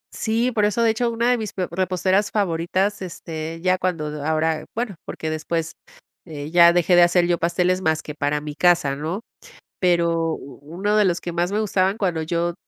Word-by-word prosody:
Sí, 230 +3 0
por 210 -3 +1
eso, 210 +3 +1
de 225 - +4
hecho, 235 +2 0
una 235 +1 +1
de 245 - +1
mis 215 -3 -5
pe 185 -2 -2
reposteras 185 +2 +1
favoritas, 190 +1 0
este, 165 -2 -6
ya 185 0 +2
cuando 155 -5 -3
ahora, 160 0 0
bueno, 230 -2 -2
porque 155 - -5
después, 160 +1 -3 0.5
eh, 150 -3 -7
ya 170 0 +7
dejé 175 +1 +3
de 175 - +7
hacer 175 0 +4
yo 175 -1 0
pasteles 180 +2 +1
más 160 -3 0
que 150 - -7
para 145 0 -1
mi 150 0 -7
casa, 170 -3 +2
¿no?, 160 +9 -4 0.6
pero 170 -2 +2
u 140 - -11
uno 185 +8 -2
de 210 - +4
los 175 -3 +1
que 175 - -5
más 175 +1 0
me 205 - -1
gustaban 195 -2 +1
cuando 175 -5 -1
yo 170 +1 -1
175 Hz, 200 wpm, -22 LUFS, 160-195 Hz, 0.6 s, ya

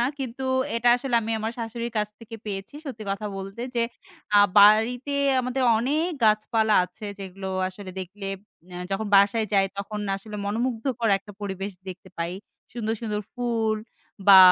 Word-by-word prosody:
না। 240 - +3
কিন্তু 265 0 -4 0.3
এটা 240 +1 +3
আসলে 250 -1 -2
আমি 225 +1 -2
আমার 220 +1 -2
শাশুড়ির 235 +1 -4
কাছ 210 - 0
থেকে 225 0 -9
পেয়েছি। 195 +5 -5
সত্যি 230 -5 -6
কথা 200 +2 -2
বলতে 195 +4 -6
যে, 235 - +2 0.5
আ - - +9 0.2
বাড়িতে 225 +7 +5 0.3
আমাদের 255 +1 -1 0.2
অনেক 295 +8 +1 0.2
গাছপালা 215 0 +3
আছে, 210 +4 -10
যেগুলো 190 0 -6 0.2
আসলে 190 0 -9
দেখলে 195 +2 -7 0.4
অ্যা 180 - -7
যখন 195 +3 -1
বাসায় 205 +3 +5
যাই, 195 -1 +4
তখন 210 +1 -4 0.2
আসলে 210 +1 -8
মনোমুগ্ধকর 230 +2 -1
একটা 205 - -13
পরিবেশ 195 0 -4 0.2
দেখতে 185 0 -9
পাই। 170 +1 -2 0.4
সুন্দর, 225 -2 -1
সুন্দর 210 -2 -2
ফুল 230 -3 0 0.5
বা 195 -1 +11
220 Hz, 155 wpm, -25 LUFS, 200-235 Hz, 0.5 s, বা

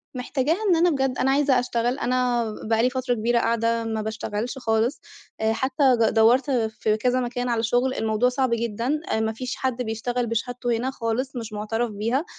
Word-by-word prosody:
محتاجاها 270 +5 0
إن 355 - +5
أنا 340 +2 +4
بجد، 270 -4 0
أنا 265 +1 +2
عايزة 275 -2 +3
أشتغل، 245 +1 -1
أنا 245 -1 +1 0.3
بقى 225 0 +3
لي 250 - +4
فترة 255 -1 -1
كبيرة 235 +1 +1
قاعدة 230 0 +1
ما 220 -1 -2
باشتغلش 220 +3 -4
خالص، 230 +2 0 0.4
حتّى 260 +6 0 0.2
ج 225 - +4
دورت 240 +5 +4
في 220 -3 0
كذا 250 +3 +1
مكان 245 0 -2
على 230 -1 0
شغل، 245 +3 +1
الموضوع 220 +2 +1
صعب 260 0 0
جدًا، 235 +5 -1 0.2
ما 220 0 0
فيش 250 +3 -5
حد 255 -2 -2
بيشتغل 240 +2 -2
بشهادته 240 +1 -1
هنا 255 +3 -2
خالص، 255 +2 -3
مش 225 -3 -6
مُعتَرف 225 +3 -2
بيها، 230 +9 -1
240 Hz, 180 wpm, -24 LUFS, 225-255 Hz, 0.4 s, إن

